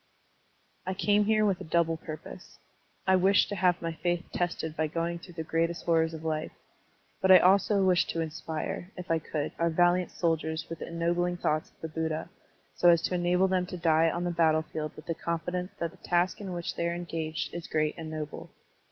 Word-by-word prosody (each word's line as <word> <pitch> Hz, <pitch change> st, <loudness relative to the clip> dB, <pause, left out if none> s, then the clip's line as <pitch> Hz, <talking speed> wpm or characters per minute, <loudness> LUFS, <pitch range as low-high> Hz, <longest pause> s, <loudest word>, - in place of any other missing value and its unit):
I 185 Hz, 0 st, -3 dB
came 205 Hz, +1 st, +3 dB
here 215 Hz, 0 st, +3 dB
with 195 Hz, -3 st, +1 dB
a -, -, -4 dB
double 165 Hz, 0 st, +1 dB
purpose. 155 Hz, -1 st, -9 dB, 0.5 s
I 190 Hz, -, +5 dB
wished 195 Hz, +2 st, +4 dB
to 205 Hz, -, -3 dB
have 180 Hz, -2 st, +2 dB
my 165 Hz, 0 st, -2 dB
faith 175 Hz, +2 st, -1 dB
tested 170 Hz, -3 st, -2 dB
by 155 Hz, -1 st, 0 dB
going 170 Hz, +2 st, -2 dB
through 175 Hz, 0 st, -13 dB
the 160 Hz, -, -3 dB
greatest 165 Hz, +2 st, -1 dB
horrors 165 Hz, -1 st, +2 dB
of 160 Hz, -, -9 dB
life, 155 Hz, -1 st, -2 dB, 0.7 s
but 190 Hz, -, +2 dB
I 185 Hz, -, +11 dB
also 195 Hz, +2 st, +4 dB
wished 180 Hz, -2 st, +3 dB
to 165 Hz, -, -2 dB
inspire, 160 Hz, +2 st, -4 dB
if 180 Hz, -2 st, -5 dB
I 165 Hz, -, +3 dB
could, 155 Hz, -1 st, -3 dB
our 170 Hz, 0 st, +2 dB
valiant 175 Hz, +2 st, +3 dB
soldiers 160 Hz, -1 st, -1 dB
with 165 Hz, -, -5 dB
the -, -, -6 dB
ennobling 175 Hz, +1 st, 0 dB
thoughts 155 Hz, -2 st, 0 dB
of -, -, -34 dB
the 160 Hz, -, -3 dB
Buddha, 160 Hz, 0 st, -3 dB, 0.4 s
so 175 Hz, -, +5 dB
as 170 Hz, -1 st, +5 dB
to -, -, -1 dB
enable 180 Hz, +1 st, +2 dB
them 185 Hz, -1 st, 0 dB
to 180 Hz, -, -6 dB
die 165 Hz, -1 st, +3 dB
on 175 Hz, +2 st, -2 dB
the 175 Hz, -, 0 dB
battlefield 160 Hz, -2 st, +1 dB
with 155 Hz, -, -11 dB
the 165 Hz, -, -1 dB
confidence 180 Hz, +3 st, -3 dB
that 170 Hz, -1 st, -2 dB
the -, -, -18 dB
task 180 Hz, +4 st, 0 dB
in 195 Hz, -2 st, -5 dB
which 175 Hz, -1 st, -4 dB
they 170 Hz, -, 0 dB
are 170 Hz, -, -2 dB
engaged 165 Hz, -2 st, -4 dB
is 170 Hz, -1 st, -6 dB
great 155 Hz, -1 st, 0 dB
and 160 Hz, -1 st, -7 dB
noble. 155 Hz, -1 st, -6 dB
170 Hz, 210 wpm, -29 LUFS, 160-180 Hz, 0.7 s, I